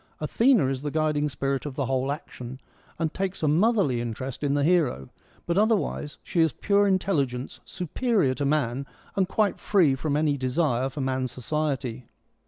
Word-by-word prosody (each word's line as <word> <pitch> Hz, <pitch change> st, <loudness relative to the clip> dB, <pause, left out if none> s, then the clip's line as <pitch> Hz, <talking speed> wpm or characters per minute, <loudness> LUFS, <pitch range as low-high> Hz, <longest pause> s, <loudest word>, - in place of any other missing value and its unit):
Athena 225 Hz, -, +3 dB
is 130 Hz, 0 st, -1 dB
the 145 Hz, -, -2 dB
guiding 150 Hz, -1 st, +1 dB
spirit 135 Hz, 0 st, -2 dB
of 145 Hz, -3 st, -6 dB
the 140 Hz, -, -1 dB
whole 130 Hz, +1 st, 0 dB
action, 130 Hz, -4 st, -7 dB, 0.4 s
and 160 Hz, -1 st, -1 dB
..takes 190 Hz, -2 st, -3 dB
a -, -, +3 dB
motherly 170 Hz, -, +3 dB
interest 120 Hz, +3 st, -5 dB
in 145 Hz, -1 st, +1 dB
the 145 Hz, -, +2 dB
hero, 150 Hz, -, +2 dB, 0.4 s
but 170 Hz, +3 st, +1 dB
otherwise 210 Hz, -8 st, 0 dB
she 170 Hz, -, 0 dB
is 160 Hz, -2 st, +3 dB
pure 205 Hz, 0 st, +2 dB
intelligence 140 Hz, -10 st, 0 dB
superior 180 Hz, -, 0 dB
to 145 Hz, -, -3 dB
man 140 Hz, -2 st, 0 dB, 0.3 s
and 190 Hz, -2 st, +2 dB
quite 210 Hz, -1 st, +1 dB
free 175 Hz, -9 st, +3 dB
from 145 Hz, +2 st, -1 dB
any 150 Hz, -2 st, +1 dB
desire 130 Hz, -1 st, 0 dB
for 145 Hz, +1 st, -5 dB
man's 130 Hz, -1 st, -1 dB
society. 130 Hz, -2 st, -3 dB
145 Hz, 170 wpm, -26 LUFS, 130-175 Hz, 0.4 s, Athena